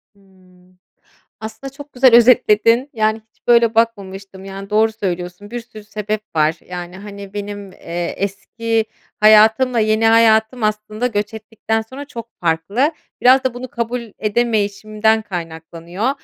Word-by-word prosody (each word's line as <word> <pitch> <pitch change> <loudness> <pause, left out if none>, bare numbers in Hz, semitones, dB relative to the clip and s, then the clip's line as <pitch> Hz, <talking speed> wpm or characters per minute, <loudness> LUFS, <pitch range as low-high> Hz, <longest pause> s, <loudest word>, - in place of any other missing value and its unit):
Hımm. 185 -2 -25 0.6
Aslında 220 +5 -8
çok 285 +1 -12
güzel 250 -1 +5
özetledin 235 +1 +5
yani 220 -2 +1
hiç - - -42
böyle 235 -1 +4
bakmamıştım 195 -4 -2
yani 195 +1 -8
doğru 220 +1 +3
söylüyorsun 180 -1 -5
bir 240 0 -4
sürü 225 -3 -13
sebep 210 0 -4
var. 155 +1 +2
Yani, 180 0 -7
hani, 200 0 -10
benim, 205 -1 -6
eee, 170 0 -5
eski 225 +3 -2 0.4
hayatımla 220 +3 +5
yeni 215 +1 +2
hayatım 225 +1 +4
aslında 215 +2 -1
göç 210 -2 -2
ettikten 220 0 -3
sonra 260 +6 -9
çok 230 -4 -9
farklı. 180 - 0 0.3
Biraz 260 +1 +5
da 260 -2 0
bunu 250 +1 -7
kabul 235 +1 -3 0.2
edemeyişimden 215 0 0
kaynaklanıyor. 170 +3 -5
215 Hz, 135 wpm, -18 LUFS, 195-230 Hz, 0.6 s, güzel